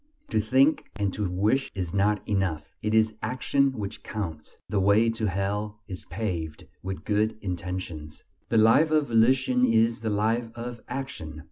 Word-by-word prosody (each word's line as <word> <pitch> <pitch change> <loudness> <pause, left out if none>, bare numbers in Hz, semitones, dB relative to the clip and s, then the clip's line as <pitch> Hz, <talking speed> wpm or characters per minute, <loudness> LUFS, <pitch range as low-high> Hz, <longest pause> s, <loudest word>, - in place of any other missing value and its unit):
To - - +2
think 130 +8 +3
and 100 -3 -1
to 105 -3 -2
wish 105 +9 +1
is 90 -3 -3
not 100 +1 +1
enough. 95 -7 -1
It 105 +1 0
is 110 0 +4
action 135 +2 +1
which 105 -5 -6
counts. 85 -8 -6
"The 100 +1 0
way 105 +4 +4
to 115 -1 -2
Hell 105 +3 -2
is 95 -3 -7
paved 85 -5 -4 0.2
with 95 0 -5
good 105 +1 +1
intentions." 90 -5 -5 0.3
The 115 - +2
life 115 +9 +5
of 155 -3 +2
volition 125 +2 +3
is 115 -1 +3
the 110 - -1
life 110 +3 0
of 120 0 -6
action. 80 - -6
105 Hz, 160 wpm, -26 LUFS, 95-115 Hz, 0.3 s, life